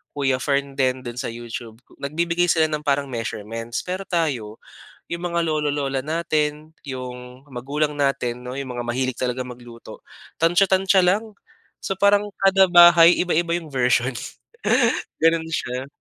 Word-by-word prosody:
Kuya 135 -3 0
Fern 140 0 -1
din 130 -1 +1
do'n 120 0 -6
sa 130 - -3
YouTube, 115 -1 -7 0.2
nagbibigay 170 +4 0
sila 160 -2 +2
ng 150 - -1
parang 140 0 +2
measurements. 115 0 -5
Pero 185 +2 -5
tayo, 135 - -2 0.4
'yong 170 0 -5
mga 170 -1 -1
lolo-lola 145 -3 -1
natin, 155 0 -2
‘yong 125 0 -8
magulang 145 +3 -2
natin 135 -4 -1
'no, 125 +2 -6
'yong 130 -2 -5
mga 120 - -3
mahilig 125 +2 -2
talagang 125 +1 -3
magluto, 120 -1 -13 0.4
tantya-tantya 190 +3 +3
lang. 195 +5 +2 0.5
So 195 - -3
parang 200 +1 +3 0.2
kada 195 0 +5
bahay 175 -1 +7
iba-iba 170 -1 0
'yong 165 -3 -4
version. 125 -1 +2 1.1
Gano'n 165 0 +3
siya. 125 -3 -3
140 Hz, 140 wpm, -22 LUFS, 125-170 Hz, 1.1 s, bahay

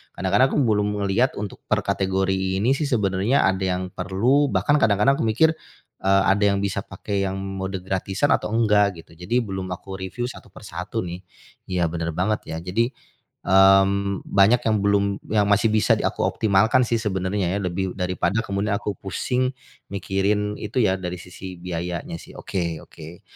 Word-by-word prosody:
Kadang-kadang 130 - +3
aku - - +3
belum 105 -3 +2 0.2
ngelihat 100 +7 +1
untuk 100 -1 -6
per - - +1
kategori 95 0 0
ini 110 +7 +2
sih 145 +2 0
sebenarnya 105 +1 +1
ada 95 0 +1
yang 90 0 -2
perlu, 115 +12 +1
bahkan 145 +2 +2
kadang-kadang 105 +5 +3
aku - - 0
mikir, 140 +9 +4 0.5
eee, 95 0 +4
ada 100 +1 +1
yang 100 -1 +3
bisa 100 0 -2
pakai 100 +1 -3
yang 95 - -3
mode 95 0 -4
gratisan 95 +7 -1
atau - - -4
enggak, 105 -5 +2
gitu. - - -23
Jadi 90 +9 0
belum 95 -3 -5
aku 95 +2 -9
reviu 95 +6 -5
satu 125 - -10
per - - -14
satu, - - -4
nih. 90 +1 -6 0.5
Iya, 90 -2 +1
bener 85 0 -2
banget, 105 +5 0
ya. 80 - -3
Jadi, 115 +7 0 0.6
mmm, 95 +1 +4
banyak 105 +5 +4
yang 110 -1 +3
belum 100 0 +3 0.3
yang 105 -2 +3
masih 105 +2 +4
bisa 110 - +4
di - - -3
aku - - -4
optimalkan 110 +4 +3
sih 115 -1 0
sebenarnya 95 -3 -1
ya, - - -2
lebih 90 +1 -2
daripada 90 +2 -1
kemudian 100 +1 -1
aku 105 0 -3
pusing 125 +6 -1 0.4
mikirin 100 +2 0
itu 110 +4 -1
ya, 95 -2 +3
dari 90 -1 -4
sisi 90 +1 -9
biayanya, 85 -1 -4
sih. - - -14
Oke 85 -4 -3
oke. 80 +2 -12
100 Hz, 175 wpm, -23 LUFS, 95-105 Hz, 0.6 s, mikir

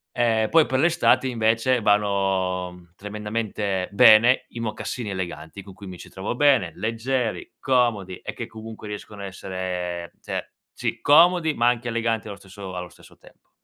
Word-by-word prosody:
ehm, 115 -3 +2
poi 165 -2 +5
per 130 0 -1
l'estate 160 -3 +3
invece 115 +1 +1
vanno, 95 -3 +1
mhmm, 90 -1 -16
tremendamente 105 -2 -3
bene 115 +3 +6
i 120 - -8
mocassini 110 +1 -4
eleganti 90 -1 -6
con 95 0 -12
cui 100 +1 -12
mi 90 - -8
ci - - -12
trovo 95 +5 -4
bene, 130 -10 +3
leggeri, 115 +2 -2
comodi 115 -8 +1
e - - -7
che - - -6
comunque 110 -1 -10
riescono 105 0 -8
a - - -5
essere 90 -2 -5
cioè, - - -5 0.2
sì - - -4
comodi 165 +1 +5
ma 120 -3 +1
anche 120 0 +1
eleganti 115 -1 -1
allo 100 -1 -7
stesso 95 -1 -10
allo 90 0 -5
stesso - - -19
tempo. - - -22
105 Hz, 165 wpm, -24 LUFS, 95-120 Hz, 0.2 s, bene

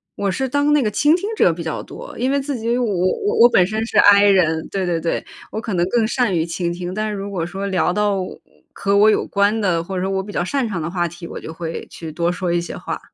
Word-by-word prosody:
我 200 -1 -1
是 265 +5 -2
当 285 +2 +2
那 295 - +4
个 215 - +1
倾 295 +9 +3
听 395 +4 -3
者 175 - +4
比 170 - -7
较 160 -2 -4
多。 - - -10
因 255 +3 0
为 280 0 +1
自 275 -2 -3
己 230 +1 -1
我 250 - 0
我 185 - 0
我 240 - +9
本 180 - +4
身 220 +1 -2
是 - - +1
I 205 0 +7
人， 170 -5 +3
对， 190 -2 -2
对， 170 -2 0
对， 165 - -2 0.3
我 220 - -4
可 215 -4 -3
能 175 0 +2
更 230 -1 +2
善 235 -6 +1
于 165 +1 0
倾 170 0 -2
听。 180 +1 -5
但 215 0 -1
是 - - -3
如 200 0 -5
果 175 -4 -2
说 195 +3 -4
聊 185 -2 +1
到 205 -1 +1
我 185 - -6 0.3
和 200 0 +1
我 210 +1 +6
有 - - +1
关 205 +2 +1
的， 170 -4 +1
或 190 +2 -6
者 180 - -1
说 190 - -1
我 190 0 -1
比 205 - -9
较 - - 0
擅 260 +4 -1
长 185 -6 -3
的 155 - -3
话 175 -1 -1
题， 170 +1 -9
我 - - -7
就 160 - -8
会 165 0 -5
去 160 -2 -8
多 170 +2 0
说 180 -1 -2
一 175 - +2
些 170 - -6
话。 - - -5
195 Hz, 305 characters per minute, -20 LUFS, 175-220 Hz, 0.3 s, 我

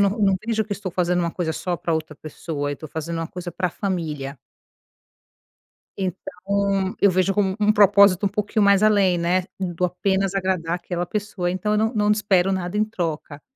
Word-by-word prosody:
não 200 -1 +4
não 200 -2 +2
vejo 220 -1 0
que 210 - -5
estou 195 -3 -5
fazendo 180 -1 +1
uma 170 -1 -1
coisa 165 -3 -2
só 175 +2 -3
pra 170 - -2
outra 155 -1 -3
pessoa, 150 -1 -5
eu 145 - -4
tô 155 +4 -9
fazendo 160 +3 -5
uma 165 - -2
coisa 180 +1 -7
pra 180 +1 -1
família. 155 -8 -4 1.6
Então, 195 +1 -2
eu 200 - +5
vejo 185 +1 +1
como 195 -1 +1
um 210 +1 +4
propósito 200 -2 +5
um - - +3
pouquinho 210 +1 -1
mais 200 0 +5
além, 200 -4 +4
né, 175 +2 +1
do 180 -2 -2
apenas 190 +2 0
agradar 185 -3 -1
aquela 175 0 -4
pessoa, 205 -4 -3
então 200 +4 -1
eu 210 - +2
não 220 +3 +1
não 210 -1 +2
espero 195 -3 +2
nada 185 +1 -3
em 210 - +3
troca. 160 -8 -5
185 Hz, 190 wpm, -22 LUFS, 170-200 Hz, 1.6 s, eu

